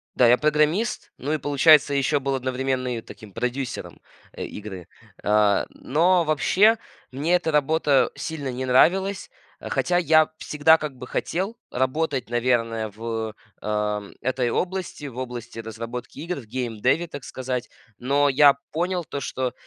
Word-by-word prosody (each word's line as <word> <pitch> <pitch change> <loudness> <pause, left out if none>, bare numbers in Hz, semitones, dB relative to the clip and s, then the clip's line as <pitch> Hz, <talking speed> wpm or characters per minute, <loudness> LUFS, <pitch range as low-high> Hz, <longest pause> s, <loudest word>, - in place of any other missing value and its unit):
Да, 125 - +5
я 120 +1 +6
программист, 155 - +1
ну, 145 +4 -2
и - - +1
получается, 145 0 +5
ещё 140 +1 +2
был 135 0 -1
одновременно 130 -1 -2
и - - -5
таким 110 -2 -13
продюсером, 125 +3 -4 0.4
а, - - -6
игры. 95 -5 -7 0.4
А, 105 -1 +3
но 170 +5 +2
вообще 165 - +4 0.3
мне 150 +7 +1
эта 165 -2 0
работа 150 -1 +2
сильно 145 -5 -4
не 130 +1 -4
нравилась, 190 +10 +3 0.3
хотя 175 - 0
я 155 -2 +4
всегда, 155 +2 +4
как 150 -2 -4
бы, 125 - -9
хотел 195 +7 -2
работать, 130 0 -1
наверное, 115 -2 0
в, 110 -1 -4 0.3
а 105 -1 -1 0.2
этой 125 -1 0
области, 180 -3 -3
в 130 -3 -8
области 120 -2 -6
разработки 115 +2 -7
игр, 170 +3 -3
в - - -16
геймдеве, 125 +7 -1
так 145 -4 -8
сказать. 130 -1 -4 0.3
Но 140 +3 +2
я 140 +1 +6 0.2
понял 175 +3 -1
то, 140 - -5
что 130 0 -3
130 Hz, 145 wpm, -24 LUFS, 120-155 Hz, 0.4 s, я